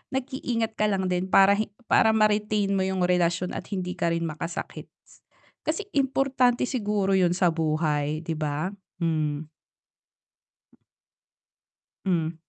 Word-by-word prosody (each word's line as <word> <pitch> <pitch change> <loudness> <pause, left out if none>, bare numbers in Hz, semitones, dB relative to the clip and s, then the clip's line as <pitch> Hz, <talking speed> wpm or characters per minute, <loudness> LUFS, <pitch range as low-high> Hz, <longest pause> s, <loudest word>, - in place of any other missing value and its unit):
Nag-iingat 245 -4 -2
ka 215 0 +1
lang 190 -2 0
din 180 +1 0
para 195 +1 +6
he 215 - -1 0.2
para 220 - +5
ma-retain 210 -1 +2
mo 195 - +1
yung 190 -1 -1
relasyon 180 0 +1
at - - -6
hindi 185 -3 -3
ka 170 - 0
rin 170 - -2
makasakit. 165 +2 -5 0.8
Kasi 330 +7 -1
importante 265 -2 +2
siguro 210 -6 -1
'yun 180 -2 +3
sa 180 -2 +3
buhay 155 -1 0
'di 165 - -2
ba? 155 +4 -2 0.3
Hmm. 155 -3 -1 2.6
Hmm. 170 -3 0
185 Hz, 125 wpm, -26 LUFS, 165-215 Hz, 2.6 s, para